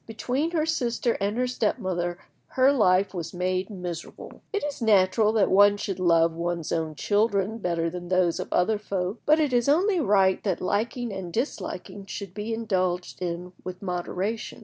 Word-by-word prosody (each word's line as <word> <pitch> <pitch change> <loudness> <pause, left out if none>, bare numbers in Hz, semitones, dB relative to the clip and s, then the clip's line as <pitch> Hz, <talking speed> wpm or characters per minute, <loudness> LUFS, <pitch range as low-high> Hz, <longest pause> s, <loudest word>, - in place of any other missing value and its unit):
Between 255 +7 -1
her 320 -3 0
sister 240 -6 0
and 205 +3 0
her 250 - +2
step 250 +1 0
mother 175 -4 -2 0.3
her 260 +1 +4
life 195 -6 +3
was 175 -1 -5
made 185 +1 -1
miserable. 180 -4 -7
It 410 - -2
is 290 -3 -4
natural 210 0 +4
that 215 -3 +2
one 205 +1 +6
should 195 -2 -4
love 165 -2 +4
one's 170 -1 -3
own 160 -2 -1
children 205 +4 +1
better 170 -4 -1
than 175 +1 -6
those 185 -2 +2
of - - -5
other 205 +4 +2
folk; 195 +1 -3
but 305 +2 +5
it 295 -4 +1
is 245 +2 +2
only 365 +5 +3
right 195 - +3
that 190 -5 -1
liking 230 +4 -1
and 190 -3 -6
disliking 205 - -4
should 195 -1 -6
be 210 +2 -4
indulged 185 -6 -1
in 180 +1 -4
with 185 +1 -7
moderation. 185 +4 -3
195 Hz, 175 wpm, -26 LUFS, 180-230 Hz, 0.3 s, one